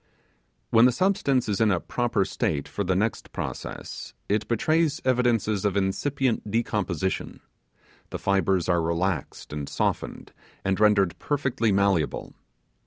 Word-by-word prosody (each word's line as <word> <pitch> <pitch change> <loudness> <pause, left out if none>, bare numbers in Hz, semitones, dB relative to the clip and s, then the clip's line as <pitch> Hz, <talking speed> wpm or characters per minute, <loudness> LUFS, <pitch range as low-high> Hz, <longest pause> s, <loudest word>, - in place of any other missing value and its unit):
When 115 0 +7
the 125 - +6
substance 160 - +1
is 105 0 0
in 110 - +4
a 90 -3 +2
proper 120 -3 0
state 70 -2 -1
for 100 - -3
the 95 -1 0
next 105 +3 -1
process, - - -6
it 105 +1 0
betrays 155 +7 +1
evidences 120 -5 +2
of 100 -1 +1
incipient 120 +5 0
decomposition; 100 -5 -1 0.7
the - - -4
fibres 95 -2 +1
are 85 -2 +2
relaxed 85 0 -2
and 75 -2 -4
softened, - - -2 0.3
and 95 0 +1
rendered 105 -4 +3
perfectly 130 -6 0
malleable. 100 -5 +1
105 Hz, 130 wpm, -26 LUFS, 95-120 Hz, 0.7 s, When